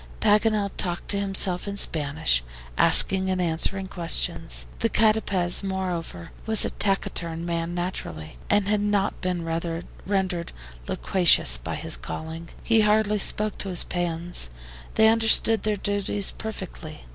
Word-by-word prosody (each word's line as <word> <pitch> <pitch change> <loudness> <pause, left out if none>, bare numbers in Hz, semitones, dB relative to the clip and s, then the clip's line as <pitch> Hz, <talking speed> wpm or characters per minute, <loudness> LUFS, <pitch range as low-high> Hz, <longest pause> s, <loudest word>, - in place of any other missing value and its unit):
Paganel 210 -1 +2
talked 175 -1 -3
to 200 - +1
himself 195 -2 0
in 200 0 -5
Spanish, 150 - +2 0.3
asking 190 0 +6
and 185 -1 -1
answering 180 +3 0
questions. - - -1
The 230 - +1
CATAPEZ, 215 -6 +2
moreover, 180 - -5 0.2
was 220 -1 +4
a - - -1
taciturn 170 -4 -2
man 170 0 -3
naturally, 130 - -6
and 205 -1 +2
had 210 0 +1
not 205 -1 -1
been 180 -2 -3 0.6
rendered 190 -3 -2 0.4
loquacious 170 - +3
by - - -5
his - - -3
calling. 160 - -7
He 225 -1 +3
hardly 210 0 +2
spoke 210 +1 -1
to 195 - -2
his 180 - +1
PEONS. 175 - -2 0.5
They 220 - +5
understood 225 0 +4
their 215 -1 -1
duties 205 0 -2
perfectly. 190 -7 -8
190 Hz, 135 wpm, -24 LUFS, 170-205 Hz, 0.6 s, asking